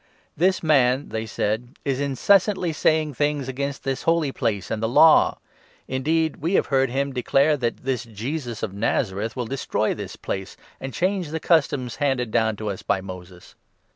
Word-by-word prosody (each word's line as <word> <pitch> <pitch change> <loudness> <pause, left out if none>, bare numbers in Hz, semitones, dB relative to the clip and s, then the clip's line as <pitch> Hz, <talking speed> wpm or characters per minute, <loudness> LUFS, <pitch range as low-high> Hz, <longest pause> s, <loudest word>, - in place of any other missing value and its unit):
"This 185 +4 +2
man," 135 -3 +3
they 110 0 -4
said, 110 +5 -2
"is 135 -1 0
incessantly 175 - +2
saying 155 -1 +1
things 145 -1 -1
against 140 +1 -4
this 135 -1 -2
Holy 165 -4 +1
Place 110 -9 -2
and 110 -1 -2
the 110 - 0
Law; 160 +6 +6 0.5
indeed, 160 +4 0
we 170 +6 -1
have - - +3
heard 135 -1 +3
14 125 - -7
him 140 0 0
declare 135 +4 +2
that 120 -4 -3
this 125 -2 -2
Jesus 120 +2 -5
of 95 - -3
Nazareth 105 +1 -1
will 125 -2 -2
destroy 115 -3 -1
this 100 -3 -7
Place, 95 -1 -5 0.2
and 135 - -5
change 185 +4 -1
the 160 +1 -3
customs 140 -8 +1
handed 135 -5 0
down 110 0 +2
to 105 0 -3
us 95 - -7
by 95 - 0
Moses." 90 -1 -10
130 Hz, 175 wpm, -23 LUFS, 110-150 Hz, 0.5 s, Law